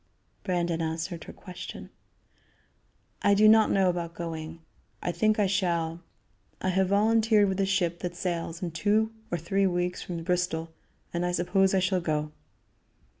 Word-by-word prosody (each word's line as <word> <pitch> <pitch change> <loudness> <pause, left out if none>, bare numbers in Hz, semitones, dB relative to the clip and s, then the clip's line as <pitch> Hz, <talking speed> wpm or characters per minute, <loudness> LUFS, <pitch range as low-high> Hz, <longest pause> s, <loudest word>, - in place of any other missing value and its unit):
Brandon 175 -3 -1
answered 165 +1 -3
her - - -8
question: 180 -1 -9 1.3
"I 200 - +4
do 215 +2 +6
not 220 0 +6
know 195 -1 +3
about 175 -1 -2
going; 165 -1 -6 0.4
I 175 - -2
think 215 +4 +2
I 210 - +3
shall. 170 -4 0 0.6
I 185 - -1
have 190 +1 +2
volunteered 215 +1 +4
with 190 0 -2
a 195 - +2
ship 175 -3 0
that 175 -1 -4
sails 170 0 -3
in 175 - -2
two 210 +6 +1 0.2
or 175 - -1
three 195 +4 +1
weeks 180 0 -1
from 170 -2 -5
Bristol, 165 -2 -1 0.4
and 170 0 -1
I 180 - 0
suppose 190 +2 +2
I - - +4
shall 185 0 +1
go." 150 -2 -1
180 Hz, 160 wpm, -28 LUFS, 170-195 Hz, 1.3 s, do